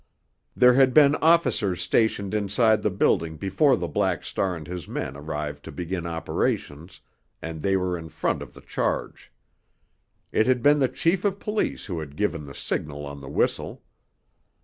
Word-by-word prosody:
There 125 0 +6
had 130 0 +4
been 145 -2 +7
officers 130 - +2
stationed 100 +2 +1
inside 105 +1 +2
the 105 - +1
building 80 -4 +1
before 100 - +2
the 85 - -3
Black 75 - 0
Star 95 -2 -1
and 80 -2 -8
his 90 -1 -7
men 65 - -4
arrived 75 0 -5
to - - -7
begin 90 0 -4
operations, 80 0 -3 0.4
and 80 -1 -6
they 95 +2 +2
were 90 -1 -1
in 85 -1 -7
the - - -10
front - - -1
of - - -10
the - - -13
charge. - - -3 1.0
It 110 - +2
had 125 -2 +2
been 145 +1 +5
the 130 -2 +2
chief 175 +2 0
of 200 -2 0
police 210 +1 -2
who 90 -4 -4
had 75 -2 -8
given 80 -5 -1
the 70 -2 -10
signal 75 -1 -4
on 70 0 -8
the 70 - -9
whistle. - - -1
90 Hz, 175 wpm, -25 LUFS, 80-125 Hz, 1.0 s, been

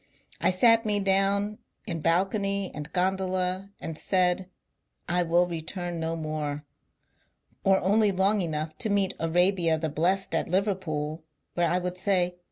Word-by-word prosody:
I - - +3
sat 230 +5 +5
me 210 -2 0
down 200 +2 +1 0.3
in 170 -6 -4
balcony 195 +3 0
and 150 +1 -7
gondola 185 +1 0
and 165 -1 -6
said, 185 0 +1 0.6
I 180 +1 +2
will 175 +1 +3
return 175 +1 -5
no 165 0 -2
more, 150 -2 -4 0.5
— - - -42
or 195 0 +4
only 205 +2 +3
long 195 +2 +2
enough 155 -2 -3
to 220 - -1
meet 200 -1 +1
Arabia 170 0 +2
the 160 0 -2
Blest 180 +5 0
at 165 - 0
Liverpool; 165 -5 -1 0.3
where 175 -1 +1
I 180 - +1
would 180 0 -3
say. 180 -2 +1
180 Hz, 150 wpm, -27 LUFS, 165-195 Hz, 0.6 s, sat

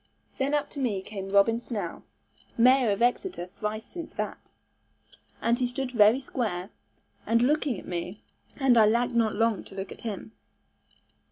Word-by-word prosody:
Then 275 +2 +1
up 290 -1 -1
to 285 - -7
me 210 -8 -1
came 195 -1 -6
Robin 200 +4 +4
Snell 235 -3 -5 0.6
(mayor 250 0 +5
of 205 +3 +1
Exeter 245 - 0
thrice 210 +4 -5
since 340 -2 -8
that), - - -4 1.0
and 235 +1 +1
he 250 - +1
stood 250 +1 -3
very 225 +1 +5
square, 215 -8 -3 0.6
and 230 +1 +3
looking 285 -3 +1
at - - -12
me, 180 +3 -5 0.3
and 260 -4 +4
I 215 - +7
lacked 240 +3 +2
not 225 -3 +2
long 225 -2 +1
to - - -13
look 195 0 -5
at - - -10
him. 220 -2 -5
230 Hz, 165 wpm, -27 LUFS, 205-255 Hz, 1.0 s, I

